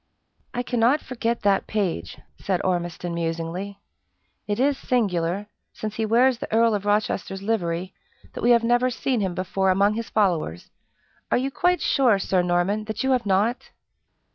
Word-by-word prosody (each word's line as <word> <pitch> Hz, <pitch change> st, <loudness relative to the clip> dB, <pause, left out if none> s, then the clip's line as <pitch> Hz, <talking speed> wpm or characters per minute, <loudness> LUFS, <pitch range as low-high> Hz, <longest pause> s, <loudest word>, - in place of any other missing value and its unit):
"I 245 Hz, -, -1 dB
cannot 245 Hz, +4 st, +2 dB
forget 235 Hz, -4 st, -3 dB
that 200 Hz, -1 st, +2 dB
page," 170 Hz, -, -2 dB, 0.2 s
said 190 Hz, -2 st, -1 dB
Ormiston, 175 Hz, -1 st, -2 dB
musingly. 170 Hz, +4 st, -3 dB, 0.7 s
"It 205 Hz, +1 st, -1 dB
is 280 Hz, +2 st, +3 dB
singular 200 Hz, -7 st, 0 dB, 0.3 s
since, 215 Hz, -1 st, -5 dB
he 220 Hz, -1 st, 0 dB
wears 240 Hz, +2 st, +3 dB
the -, -, -6 dB
Earl 230 Hz, 0 st, +4 dB
of 205 Hz, -1 st, -2 dB
Rochester's 195 Hz, -2 st, -1 dB
livery, 185 Hz, -4 st, -1 dB, 0.4 s
that -, -, -6 dB
we 240 Hz, -, +2 dB
have 235 Hz, -1 st, +5 dB
never 240 Hz, +2 st, +3 dB
seen 245 Hz, -1 st, -1 dB
him 185 Hz, -3 st, -2 dB
before 190 Hz, +1 st, 0 dB
among 200 Hz, +3 st, +3 dB
his 230 Hz, +1 st, -4 dB
followers. 170 Hz, -, 0 dB, 0.6 s
Are -, -, +3 dB
you 265 Hz, +2 st, -1 dB
quite 360 Hz, +5 st, +1 dB
sure, 250 Hz, -7 st, +3 dB
Sir 190 Hz, -1 st, +1 dB
Norman, 180 Hz, +4 st, 0 dB
that 220 Hz, +1 st, -4 dB
you 265 Hz, -, +1 dB
have 250 Hz, -4 st, +1 dB
not?" 205 Hz, +5 st, +1 dB
205 Hz, 165 wpm, -24 LUFS, 185-235 Hz, 0.7 s, have